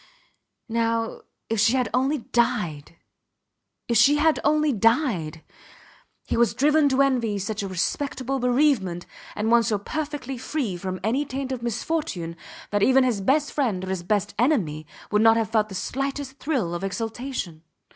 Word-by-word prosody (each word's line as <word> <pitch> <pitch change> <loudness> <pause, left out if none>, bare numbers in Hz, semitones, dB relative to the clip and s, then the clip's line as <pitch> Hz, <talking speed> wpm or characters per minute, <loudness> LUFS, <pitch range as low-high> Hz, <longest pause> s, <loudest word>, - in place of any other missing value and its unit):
Now 230 -1 -1 0.3
if 225 -1 -1
she 225 +3 +4
had 255 -2 +1
only 265 +4 +2
died! 215 - -1 0.9
If 235 - +2
she 275 +6 +6
had 310 +1 +3
only 305 0 +2
died! 215 - +1 0.8
He - - -2
was 235 -1 +2
driven 295 +2 +4
to 270 +1 +3
envy 240 -6 +1
such 205 +2 -3
a 200 - -3
respectable 260 +8 -2
bereavement, 245 - +1 0.3
and 220 +2 -1
one 235 0 +6
so 215 -1 0
perfectly 285 +2 -5
free 255 - -2
from 185 +1 -5
any 245 +7 +1
taint 270 -1 -5
of 255 -2 -3
misfortune 235 - -3 0.4
that 205 0 +1
even 265 +4 +5
his 235 -6 0
best 275 +8 +1
friend 225 -11 0
or - - -7
his 190 -2 -2
best 200 +2 -1
enemy 175 - +1 0.2
would 210 0 +3
not 225 0 +6
have 225 -1 -1
felt 215 -1 +2
the 190 - -7
slightest 275 +6 -4
thrill 250 - -1
of 175 +2 -4
exultation. 220 - -4
235 Hz, 160 wpm, -24 LUFS, 200-270 Hz, 0.9 s, she